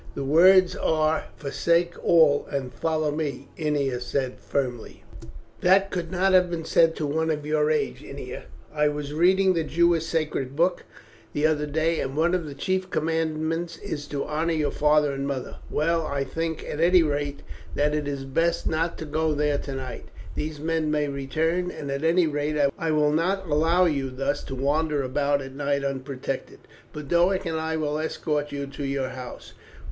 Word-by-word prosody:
"The 140 - -3
words 180 +6 +6
are 155 0 +1
'Forsake 170 +4 +1
all, 155 -4 +4
and 135 -3 -3
follow 155 +4 0
Me,'" 145 -3 -4
Ennia 145 -5 0
said 130 +1 -2
firmly. 125 -5 -3 0.6
"That 195 +2 +4
could 175 -2 -3
not 190 +1 +2
have 180 -1 +5
been 165 -2 -4
said 165 0 +4
to 155 - -2
one 160 +3 0
of 150 -2 -2
your 150 0 +2
age, 155 -1 -1
Ennia. - - -8 0.3
I 150 0 +2
was 150 -1 -3
reading 185 +4 +4
the 165 -2 0
Jewish 170 +1 +2
sacred 150 -5 -2
book 175 +3 +1 0.5
the 145 - +1
other 150 -1 +1
day, 160 +3 0
and 135 +1 -3
one 170 +3 +2
of 175 -4 0
the 140 - -7
chief 185 +5 -1
commandments 160 +1 -1
is 145 -1 -5
to 140 -1 -3
honour 160 +3 -1
your 150 -2 0
father 150 -1 +3
and 140 0 -3
mother. 135 -2 -4
Well, 165 +1 +1
I 140 -1 -1
think, 160 +4 -3
at 150 - -4
any 175 +1 +5
rate, 145 -1 -2 0.3
that 150 +1 +2
it 150 -1 -1
were 140 -1 -4
best 165 +5 0
not 165 +2 0
to 160 - -6
go 155 +1 0
there 145 -1 +1
tonight. 135 -2 -6 0.3
These 150 -1 -4
men 160 0 0
may 150 -1 +1
return, 160 +6 -1
and 140 -5 -6
at 140 +2 -3
any 170 +2 +4
rate 150 0 -1 0.2
I 165 - -2
will 150 -1 +3
not 185 +5 0
allow 165 +4 +3
you 140 -5 0
thus 135 +3 -2
to 135 - -5
wander 145 +2 0
about 140 +2 0
at 135 0 -9
night 140 0 -1
unprotected. 135 -1 -4 0.3
Boduoc 175 +6 +1
and 160 -1 -1
I 160 0 -2
will 150 -1 -1
escort 150 -2 -2
you 140 0 -3
to 140 +1 -7
your 135 -1 -1
house. 125 -1 -9
150 Hz, 180 wpm, -25 LUFS, 140-165 Hz, 0.6 s, words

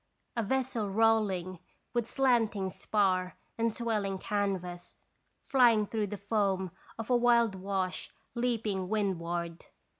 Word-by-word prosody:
A 235 - +1
vessel 240 -2 -1
rolling 195 -4 +2 0.3
with 240 -2 0
slanting 225 -8 +2
spar 185 -2 0 0.2
and 230 0 +1
swelling 210 -4 -1
canvas, 185 -3 -3 0.5
flying 235 -5 +5
through 215 0 -1
the 205 +1 -5
foam 200 -3 0 0.3
of 225 +2 -4
a - - +6
wild 235 -3 +4
wash 190 -1 -3 0.2
leaping 225 -6 -1
windward. 175 -5 -2
205 Hz, 115 wpm, -31 LUFS, 190-230 Hz, 0.5 s, a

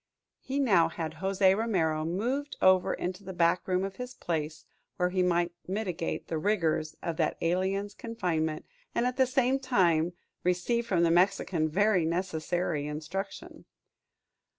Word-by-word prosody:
He 270 - -4
now 190 -12 +4
had 160 -1 -5
José 190 0 +3
Romero 170 -8 0
moved 250 - -2
over 185 -1 +4
into 185 +2 -4
the 190 0 -7
back 170 +1 +2
room 185 0 +1
of 195 0 -5
his 250 0 -6
place, 155 -2 -3 0.3
where 180 0 +1
he 185 0 +1
might 175 -1 +2 0.2
mitigate 185 -4 -3
the 160 - -2
rigors 160 -5 0
of 165 -2 -3
that 160 - 0
alien's 190 +4 0
confinement, 175 -10 -2 0.3
and 235 - +2
at 250 0 -1
the 260 -1 +4
same 260 +1 +2
time 175 -10 +2 0.3
receive 190 +7 0
from 175 -5 +2
the 165 - +4
Mexican 175 -2 +2
very 200 +2 +3
necessary 170 -2 -1
instruction. 160 +7 -6
180 Hz, 150 wpm, -29 LUFS, 165-205 Hz, 0.3 s, now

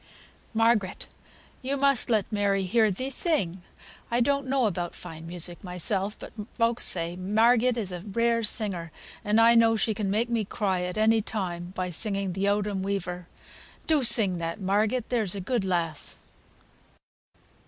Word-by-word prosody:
"Margaret, 225 -4 +1 0.6
thou 270 +2 -1
must 275 -4 +2
let 215 -3 +1
Mary 200 -2 +1
hear 220 +3 +2
thee 255 +8 -4
sing. 200 - +1 0.5
I 235 - +1
don't 280 +2 +1
know 265 -2 +1
about 175 -4 -2
fine 160 0 -9
music 175 +1 -3
myself, 190 +3 -2
but - - -11 0.2
folks 230 0 +2
say 170 -1 +2
Margaret 225 +6 +2
is 205 -5 -3
a 180 - -5
rare 230 +4 0
singer, 200 -7 0 0.3
and 210 +2 +2
I 230 +1 +6
know 230 -1 +4
she 220 0 0
can 205 -1 -3
make 220 +4 +1
me 235 -2 -1
cry 190 -2 -2
at 180 +2 -4
any 220 +1 +3
time 180 -5 -4
by 180 -1 -3
singing 195 0 -1
'Th' 195 +2 -1
Owdham 205 -1 0
Weaver.' 180 -3 -4 0.6
Do 310 -4 +2
sing 215 -6 +5
that, 165 +3 -4
Margaret, 210 +5 0
there's 220 -6 0
a - - -4
good 225 +3 -1
lass." 170 -5 -2
205 Hz, 160 wpm, -26 LUFS, 185-230 Hz, 0.6 s, I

